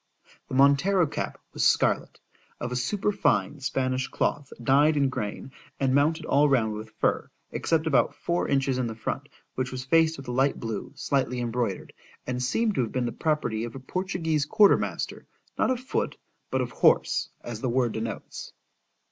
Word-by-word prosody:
The - - -5
Montero 140 +8 +4
cap 145 - -4
was - - -1
scarlet, - - +2 0.4
of 120 - -4
a - - -2
superfine 145 - 0
Spanish 130 -1 -1
cloth, 145 -2 -2
dyed 145 +5 +4
in 140 -2 +3
grain, 125 +1 -5 0.3
and 135 -1 +2
mounted 155 +3 +2
all 145 0 +4
round 115 -5 +2
with 110 +1 -7
fur, - - +1 0.2
except 160 -1 0
about 145 -6 +2
four 175 +1 -1
inches 135 -2 +1
in 125 - 0
the 110 - -5
front, 110 - -4 0.2
which 125 0 -2
was 130 0 -5
faced 160 +2 +3
with 135 -1 -10
a - - -3
light 135 +3 +1
blue, 115 -4 -4
slightly 130 -3 0
embroidered,—and 120 +1 -4
seemed 215 - +1
to 130 - +1
have 115 - -2
been 125 -1 -1
the 120 - -2
property 150 -9 -1
of 120 +1 -6
a - - -6
Portuguese 165 0 -1
quarter 205 +4 +6
master, - - -4 0.3
not - - +3
of 255 -2 0
foot, 420 - -2 0.3
but - - 0
of - - -3
horse, - - +3
as 115 -2 -6
the 130 - 0
word 120 -1 +1
denotes. 115 +1 -6
135 Hz, 175 wpm, -27 LUFS, 120-155 Hz, 0.4 s, quarter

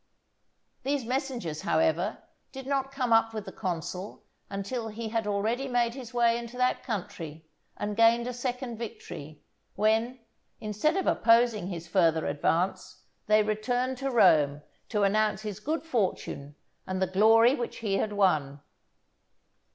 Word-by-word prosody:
These 275 -1 -1
messengers, 245 - -3
however, 170 +6 +1 0.3
did 265 -1 -8
not 270 0 -1
come 255 -4 0
up 225 0 +3
with 215 -2 -4
the 190 - -7
consul 180 +1 -5 0.3
until 200 +4 -4
he 220 +1 -5
had 225 -1 -1
already 220 +6 0
made 240 -2 +1
his 255 -2 -8
way 235 -1 +3
into 235 +1 -8
that 250 0 +1
country 175 - -6 0.3
and 205 0 -3
gained 230 +1 +4
a 250 - -3
second 245 -1 -4
victory; 155 -9 -8 0.3
when, 225 +4 +1 0.4
instead 220 - 0
of 385 - 0
opposing 230 -4 +3
his 170 -3 -6
further 165 -3 +2
advance, 165 +5 -1 0.2
they 215 0 +5
returned 245 +4 -1
to 275 0 -1
Rome 150 - +4 0.3
to 210 -3 +1
announce 210 0 +2
his 210 -2 -5
good 310 +9 -2
fortune 190 - -2 0.3
and 185 0 -2
the 190 - +2
glory 220 +6 +5
which 240 -4 -4
he 195 -2 +1
had 210 +1 -1
won. 155 -9 +1
220 Hz, 145 wpm, -28 LUFS, 190-245 Hz, 0.4 s, they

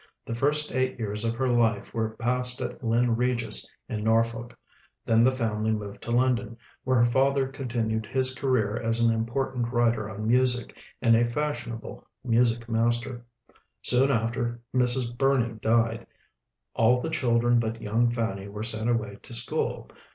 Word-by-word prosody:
The - - -5
first 150 +5 +1
eight 130 0 -1
years 105 -2 -3
of 115 0 -1
her 130 +2 -1
life 115 -4 +1
were 110 -1 -2
passed 125 +1 +4
at 125 0 -6
Lynn 115 +1 +1
Regis 120 -1 0 0.2
in 105 -2 -4
Norfolk; 115 +1 0 0.5
then 115 0 +3
the 125 - +5
family 110 -4 -2
moved 105 -2 -6
to - - -8
London, 120 -1 0 0.3
where 130 0 +1
her 120 - +5
father 135 +2 +2
continued 115 -5 -3
his 130 +1 0
career 125 -6 0
as 115 0 -1
an 115 0 +3
important 120 +1 -2
writer 115 -3 +1
on 110 0 -6
music 125 0 +2 0.3
and 115 0 +5
a 120 +1 +2
fashionable 120 -5 -4 0.2
music 120 -1 +1
master. 120 +2 -1 0.6
Soon 130 +2 +6
after, 120 0 -1 0.2
Mrs. 125 -1 +2
Burney 130 -3 +1
died. 115 +1 0 0.7
All 120 +2 +3
the - - -4
children 120 -1 +2
but 115 0 -3
young 115 +3 +1
Fanny 115 -5 -3
were 105 +1 -6
sent 110 0 -3
away 105 -4 -2
to 125 - -10
school. 120 - -2
120 Hz, 160 wpm, -26 LUFS, 115-125 Hz, 0.7 s, Soon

